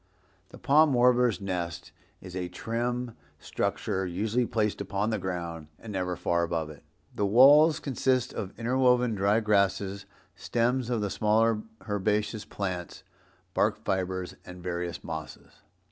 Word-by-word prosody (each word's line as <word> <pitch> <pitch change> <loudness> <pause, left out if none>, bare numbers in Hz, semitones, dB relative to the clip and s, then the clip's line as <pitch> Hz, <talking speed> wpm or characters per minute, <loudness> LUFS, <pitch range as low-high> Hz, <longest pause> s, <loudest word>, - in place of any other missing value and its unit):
The - - -12
Palm 150 +1 +4
Warbler's 125 -2 +4
nest 90 -3 -4 0.3
is 90 -1 -10
a 90 -1 -2
trim 120 +5 -3 0.2
structure, 95 +5 -2
usually 105 +7 -1
placed 105 -3 -1
upon 100 +2 -1
the 110 - -1
ground 85 -4 -5
and 110 -2 -9
never 90 -2 -2
far 85 0 0
above 85 -2 -2
it. 75 - -15 0.3
The 100 - 0
walls 145 +8 +7
consist 130 -2 0
of 95 -2 -6
interwoven 125 0 +2
dry 100 +2 +2
grasses, 100 -2 0 0.3
stems 120 +1 0
of 120 -3 0
the 100 -2 -2
smaller 110 +1 +2 0.3
herbaceous 105 +1 -1
plants, 90 -5 -5 0.5
bark - - 0
fibres 95 -1 -2
and 90 -1 -11
various 85 -1 -4
mosses. 80 -2 -8
105 Hz, 135 wpm, -28 LUFS, 90-120 Hz, 0.5 s, walls